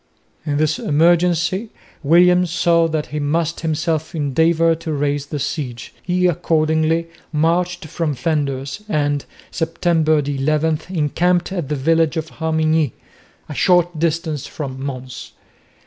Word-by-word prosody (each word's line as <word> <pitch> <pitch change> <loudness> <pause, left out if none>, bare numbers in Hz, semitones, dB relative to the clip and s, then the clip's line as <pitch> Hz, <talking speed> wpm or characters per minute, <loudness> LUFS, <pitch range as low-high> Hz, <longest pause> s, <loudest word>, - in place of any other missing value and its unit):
In 145 -1 0
this 155 0 +1
emergency 175 +6 +2 0.3
William 180 +4 +5
saw 170 0 +2
that 155 -2 -2
he 150 - -1
must 160 +3 -1
himself 160 0 -2
endeavour 160 +3 +2
to 160 0 -5
raise 145 -1 -1
the 150 - -4
siege. 130 -4 -4
He 180 0 0
accordingly 160 -1 +1 0.2
marched 170 +3 0
from 155 -1 -2
Flanders 140 - -2
and, 145 -5 0 0.3
September 165 -1 +1
11, 150 +2 0
encamped 175 +2 +1
at 175 -7 -3
the 150 - 0
village 160 +3 +2
of 160 0 -3
Harmignies, 160 -3 +1 0.5
a 150 - -6
short 175 0 +2
distance 160 -3 -1
from 135 -3 -6
Mons. 130 -2 -7
160 Hz, 125 wpm, -19 LUFS, 145-170 Hz, 0.5 s, William